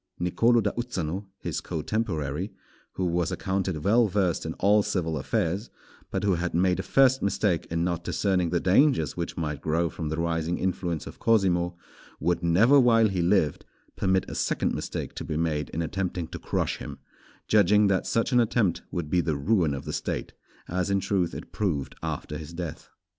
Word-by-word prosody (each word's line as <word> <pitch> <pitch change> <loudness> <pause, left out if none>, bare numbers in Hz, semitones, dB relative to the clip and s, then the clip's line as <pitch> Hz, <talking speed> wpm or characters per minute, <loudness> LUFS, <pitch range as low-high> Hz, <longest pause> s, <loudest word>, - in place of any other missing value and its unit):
Nicolò 115 +7 +3
da 100 - +1
Uzzano, 100 -6 -3
his - - -4
cotemporary, 90 - -2 0.4
who 95 - -2
was 85 -1 0
accounted 95 -5 -2
well 115 +4 +4
versed 95 -3 0
in - - -4
all 105 +2 +4
civil 85 -5 -1
affairs, 85 - -1 0.4
but - - -2
who 100 -2 +3
had 85 0 -2
made 90 +1 +2
a - - +1
first 130 -1 +4
mistake 100 -3 0
in 85 0 -1
not 85 -1 -1
discerning 90 -2 0
the 85 +1 +1
dangers 95 - +3
which 85 -1 -4
might 75 -5 -3
grow 80 +1 0
from 80 0 -4
the 80 - -2
rising 85 0 -1
influence 90 -4 -2
of - - -10
Cosimo, 90 -6 +2 0.4
would 85 +3 0
never 110 +12 +5
while 115 -3 +5
he 95 -2 -1
lived, 85 -4 +2 0.3
permit 95 -1 +1
a - - -6
second - - 0
mistake - - -4
to - - -6
be 75 - -3
made 80 -2 -1
in 85 - -2
attempting 90 +1 -2
to - - -7
crush - - -1
him; - - -8 0.5
judging 105 0 +5
that 100 -2 +1
such 115 +3 +1
an 125 - +5
attempt 110 -6 +1
would 85 -3 -3
be 90 +3 +2
the 80 -3 -1
ruin 80 -1 +1
of 70 - -7
the - - -4
State, - - -3 0.3
as 90 +2 -1
in 100 0 +2
truth 95 -2 0
it - - -8
proved 80 -10 -2
after 75 - -4
his 80 +2 -9
death. 85 -3 -6
90 Hz, 185 wpm, -27 LUFS, 85-100 Hz, 0.5 s, never